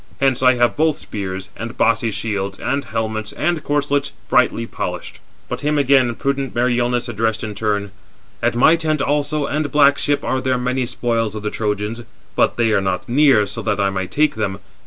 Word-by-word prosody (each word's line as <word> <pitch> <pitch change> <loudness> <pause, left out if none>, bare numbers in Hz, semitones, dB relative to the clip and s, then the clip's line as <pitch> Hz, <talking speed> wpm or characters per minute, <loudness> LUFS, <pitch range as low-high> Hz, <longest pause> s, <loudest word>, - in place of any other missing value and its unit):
Hence 135 -2 +2
I 130 -1 +5
have 120 0 +2
both 155 0 +2
spears, 95 -2 -6
and 115 +3 -7
bossy 115 0 +2
shields, 100 -2 -3
and 140 +2 -1
helmets, 110 -1 -3
and 165 -1 -1
corslets, 145 -1 0 0.2
brightly 115 - +3
polished." - - -5 0.3
But - - -4
him 150 +1 +1
again 130 -4 +3
prudent 135 -1 -2
Meriones 120 0 +1
addressed 110 -1 -1
in 110 -1 -4
turn: 105 -1 -1 0.5
"At - - +1
my 155 +7 +6
tent 155 -3 0
also 145 +1 0
and 150 0 -2
black 145 -1 +5
ship 145 0 0
are 130 - -1
there 130 -1 +1
many 125 0 -1
spoils 115 -3 -1
of 105 - -6
the 105 - -2
Trojans; 105 +2 -2 0.3
but - - +2
they 115 -2 +2
are 105 - +3
not 95 -1 -2
near, 130 -4 +4
so 100 - -6
that 105 -1 -1
I 100 -1 +2
might 95 -1 -3
take 155 +1 +2
them. 100 -3 -2
120 Hz, 190 wpm, -19 LUFS, 105-140 Hz, 0.5 s, my